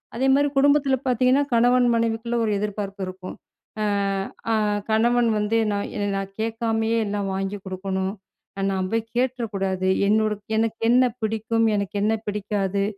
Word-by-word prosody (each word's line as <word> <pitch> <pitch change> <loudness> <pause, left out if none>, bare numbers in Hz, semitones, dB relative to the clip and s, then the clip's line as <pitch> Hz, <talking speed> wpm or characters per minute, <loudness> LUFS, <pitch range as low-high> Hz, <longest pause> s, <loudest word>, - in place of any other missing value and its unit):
அதேமாதிரி 270 +3 +3
குடும்பத்தில 280 -1 +4
பார்த்தீங்கன்னா 255 +3 +3
கணவன் 245 +1 +4
மனைவிக்குள்ளே 230 +1 -1
ஒரு 215 - 0
எதிர்பார்ப்பு 200 -1 -4
இருக்கும். 185 0 -8 0.5
அ - - +1 0.7
அ - - +3 0.4
கணவன் 235 +2 +3
வந்து 210 +2 +1
நான் 200 0 -2
என்ன 205 - -1
"நான் 195 0 -5
கேட்காமயே 225 0 0
எல்லாம் 205 -1 -2
வாங்கி 195 +1 -2
கொடுக்கணும், 190 0 -3 0.6
நான் 190 -1 -1
போய் 225 0 0
கேட்டுற 250 -1 0
கூடாது, 190 -1 -1 0.2
என்னோட 215 +1 +2 0.2
எனக்கு 225 0 0
என்ன 250 +2 +5 0.2
பிடிக்கும்? 225 +1 0
எனக்கு 200 -1 -3
என்ன 215 +1 +2
பிடிக்காது? 200 -1 -1
220 Hz, 140 wpm, -23 LUFS, 200-235 Hz, 0.7 s, என்ன